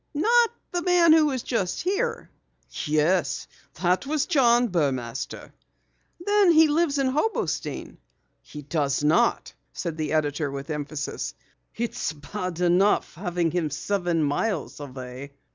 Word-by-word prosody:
"Not 465 Hz, +9 st, +4 dB, 0.2 s
the 350 Hz, -, -1 dB
man 345 Hz, -2 st, +5 dB
who 315 Hz, -1 st, +5 dB
was 260 Hz, -4 st, -2 dB
just 195 Hz, -7 st, -2 dB
here?" 405 Hz, +7 st, -2 dB, 0.5 s
"Yes, 155 Hz, +4 st, +1 dB, 0.3 s
that 180 Hz, +7 st, 0 dB
was 305 Hz, -1 st, 0 dB
John 245 Hz, -7 st, +3 dB
Burmaster." 135 Hz, -, -2 dB, 0.7 s
"Then 410 Hz, -3 st, +4 dB
he 320 Hz, -1 st, +6 dB
lives 300 Hz, -1 st, +1 dB
in 275 Hz, -, +1 dB
Hobostein?" 305 Hz, +11 st, -2 dB, 0.4 s
"He 150 Hz, -1 st, -10 dB
does 145 Hz, -1 st, -1 dB
not," 155 Hz, +3 st, +2 dB, 0.2 s
said 165 Hz, -3 st, -4 dB
the 155 Hz, -1 st, -2 dB
editor 145 Hz, -1 st, 0 dB
with 140 Hz, +2 st, -6 dB
emphasis. 150 Hz, 0 st, -4 dB, 0.4 s
"It's 230 Hz, -7 st, -2 dB
bad 180 Hz, +3 st, -5 dB
enough 180 Hz, +4 st, +3 dB
having 175 Hz, -2 st, -1 dB
him 170 Hz, -2 st, -1 dB
seven 175 Hz, +1 st, -1 dB
miles 150 Hz, +9 st, -1 dB
away. 130 Hz, 0 st, -8 dB
180 Hz, 125 wpm, -25 LUFS, -, 0.7 s, he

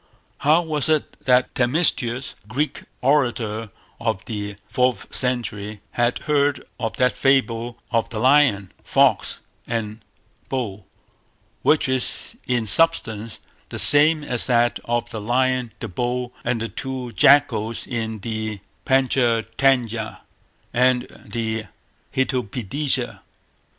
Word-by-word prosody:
How 155 Hz, +4 st, +4 dB
was 155 Hz, -3 st, -1 dB
it 155 Hz, -2 st, +1 dB
that 125 Hz, -1 st, +3 dB
Themistius, 125 Hz, -2 st, +1 dB
a -, -, -26 dB
Greek 140 Hz, +8 st, -2 dB, 0.2 s
orator 120 Hz, -6 st, +1 dB, 0.3 s
of 105 Hz, +4 st, -2 dB
the 105 Hz, -2 st, -5 dB
fourth 125 Hz, -1 st, 0 dB
century 105 Hz, -5 st, -1 dB
had 120 Hz, 0 st, +1 dB
heard 145 Hz, -2 st, +1 dB, 0.2 s
of 115 Hz, -2 st, -3 dB
that 125 Hz, -1 st, +3 dB
fable 120 Hz, -3 st, +1 dB
of 115 Hz, -2 st, +1 dB
the 115 Hz, -, -6 dB
lion, 125 Hz, -6 st, +3 dB
fox, -, -, +2 dB, 0.3 s
and 110 Hz, -2 st, -3 dB, 0.5 s
bull, 105 Hz, -7 st, -4 dB, 0.7 s
which 150 Hz, -, +3 dB
is 130 Hz, -, -2 dB
in 120 Hz, -3 st, +1 dB
substance 115 Hz, -, +1 dB, 0.3 s
the -, -, -6 dB
same 150 Hz, +1 st, +6 dB
as 125 Hz, -5 st, +1 dB
that 120 Hz, -1 st, +2 dB
of 120 Hz, 0 st, -1 dB
the 110 Hz, -, -5 dB
lion, 125 Hz, +1 st, +1 dB
the -, -, -5 dB
bull, 125 Hz, +5 st, -3 dB
and 115 Hz, -, 0 dB
the 115 Hz, -, -3 dB
two 130 Hz, -2 st, -5 dB
jackals 115 Hz, -6 st, +3 dB
in 110 Hz, -3 st, -4 dB
the 110 Hz, -1 st, -4 dB, 0.3 s
Pantcha 130 Hz, -4 st, +2 dB
Tantya 120 Hz, -5 st, +1 dB, 0.5 s
and 125 Hz, 0 st, +3 dB, 0.2 s
the 110 Hz, -2 st, -3 dB, 0.5 s
Hitopadesa? 130 Hz, +1 st, -1 dB
120 Hz, 120 wpm, -22 LUFS, 110-135 Hz, 0.7 s, same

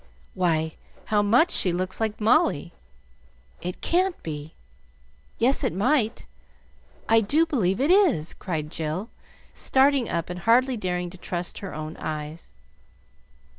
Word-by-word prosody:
"Why, 160 Hz, -3 st, 0 dB, 0.3 s
how 210 Hz, -1 st, +2 dB
much 240 Hz, +12 st, +4 dB
she 180 Hz, -, +3 dB
looks 185 Hz, +2 st, -2 dB
like 220 Hz, -1 st, -1 dB
Molly! 215 Hz, -, +2 dB, 0.9 s
It 180 Hz, +1 st, -5 dB
can't 365 Hz, +1 st, +1 dB
be 150 Hz, -1 st, -7 dB, 0.8 s
yes, 255 Hz, +4 st, +2 dB
it -, -, 0 dB
might, 230 Hz, -, +1 dB, 0.8 s
I 225 Hz, 0 st, +5 dB
do 300 Hz, +10 st, +3 dB
believe 220 Hz, -, 0 dB
it 285 Hz, +6 st, +3 dB
is!" 345 Hz, -, +3 dB
cried 155 Hz, -5 st, -4 dB
Jill, 160 Hz, +7 st, -4 dB, 0.4 s
starting 270 Hz, -2 st, +2 dB
up 170 Hz, +1 st, -2 dB
and 180 Hz, -, -6 dB
hardly 245 Hz, +7 st, +3 dB
daring 180 Hz, -4 st, -3 dB
to 185 Hz, -, -13 dB
trust 175 Hz, -1 st, -5 dB
her 195 Hz, -, -7 dB
own 155 Hz, +1 st, -6 dB
eyes. 155 Hz, +1 st, -6 dB
190 Hz, 130 wpm, -25 LUFS, 170-255 Hz, 0.9 s, I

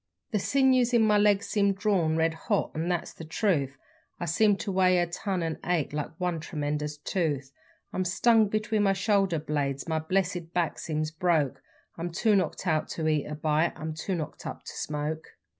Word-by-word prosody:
The 210 Hz, -, +1 dB
sinews 255 Hz, +1 st, +3 dB
in 230 Hz, -, +5 dB
my 210 Hz, -1 st, +4 dB
legs 205 Hz, 0 st, +3 dB
seem 200 Hz, -2 st, +2 dB
drawn, 190 Hz, -6 st, +1 dB
red 160 Hz, 0 st, +2 dB
hot 160 Hz, -, -1 dB
'n 160 Hz, +2 st, -2 dB
that's 175 Hz, -2 st, -2 dB
the -, -, -10 dB
truth; 155 Hz, -5 st, 0 dB, 0.4 s
I 175 Hz, -, -2 dB
seem 205 Hz, +5 st, +3 dB
to 200 Hz, -, -3 dB
weigh 185 Hz, -1 st, +4 dB
a 175 Hz, -, +3 dB
ton, 180 Hz, +1 st, -3 dB
and 165 Hz, -1 st, -3 dB
ache 170 Hz, -5 st, 0 dB
like 150 Hz, -1 st, -2 dB
one 180 Hz, -3 st, -1 dB
tremendous 150 Hz, -1 st, -3 dB
tooth; 145 Hz, -4 st, -2 dB, 0.4 s
I'm 185 Hz, -, 0 dB
stung 220 Hz, +4 st, +4 dB
between 215 Hz, +1 st, 0 dB
my 195 Hz, -1 st, +3 dB
shoulder 195 Hz, -3 st, +2 dB
blades 145 Hz, -2 st, -2 dB
my 160 Hz, -1 st, 0 dB
blessed 175 Hz, 0 st, -1 dB
back 175 Hz, -2 st, 0 dB
seems 155 Hz, -1 st, -2 dB
broke; 160 Hz, -5 st, +1 dB, 0.4 s
I'm 170 Hz, +1 st, -2 dB
too 210 Hz, +5 st, +2 dB
knocked 185 Hz, -1 st, -1 dB
out 155 Hz, -3 st, +1 dB
to 160 Hz, -1 st, -1 dB
eat 155 Hz, -2 st, +1 dB
a 150 Hz, -, -5 dB
bite 155 Hz, +2 st, +1 dB
I'm 155 Hz, 0 st, -5 dB
too 180 Hz, +4 st, -3 dB
knocked 155 Hz, -3 st, -5 dB
up -, -, -7 dB
to -, -, -7 dB
smoke. 150 Hz, +1 st, -4 dB
170 Hz, 190 wpm, -28 LUFS, 155-195 Hz, 0.4 s, in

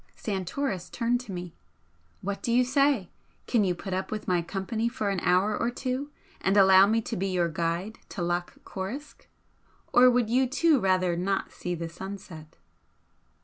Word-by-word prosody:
Santoris 190 Hz, 0 st, -3 dB
turned 240 Hz, +1 st, 0 dB
to 240 Hz, -5 st, -9 dB
me. 175 Hz, -2 st, -6 dB, 0.7 s
"What 200 Hz, +1 st, -3 dB
do 235 Hz, -, -1 dB
you 245 Hz, +2 st, +5 dB
say? 270 Hz, -6 st, +2 dB, 0.3 s
Can 230 Hz, -4 st, +2 dB
you 180 Hz, -2 st, +1 dB
put 190 Hz, +2 st, -6 dB
up 190 Hz, +1 st, -2 dB
with 215 Hz, -1 st, -5 dB
my 180 Hz, -1 st, +2 dB
company 205 Hz, +6 st, -2 dB
for 220 Hz, -5 st, -2 dB
an 195 Hz, -, -1 dB
hour 185 Hz, +5 st, +2 dB
or 235 Hz, -, 0 dB
two 255 Hz, +3 st, -3 dB, 0.3 s
and 195 Hz, +2 st, +2 dB
allow 190 Hz, 0 st, +7 dB
me 225 Hz, +2 st, +2 dB
to -, -, -4 dB
be 195 Hz, +2 st, -1 dB
your 180 Hz, -2 st, +1 dB
guide 170 Hz, +6 st, -2 dB
to 180 Hz, -, -4 dB
Loch 175 Hz, +1 st, -2 dB
Coruisk? 230 Hz, +11 st, -7 dB, 0.7 s
Or 250 Hz, +1 st, +8 dB
would 245 Hz, -2 st, +2 dB
you, 255 Hz, +3 st, +2 dB
too, 310 Hz, +1 st, +3 dB
rather 185 Hz, -3 st, +2 dB
not 190 Hz, +3 st, -1 dB
see 175 Hz, 0 st, -4 dB
the 165 Hz, 0 st, -4 dB
sunset?" 175 Hz, -3 st, -9 dB
195 Hz, 175 wpm, -27 LUFS, 180-240 Hz, 0.7 s, Or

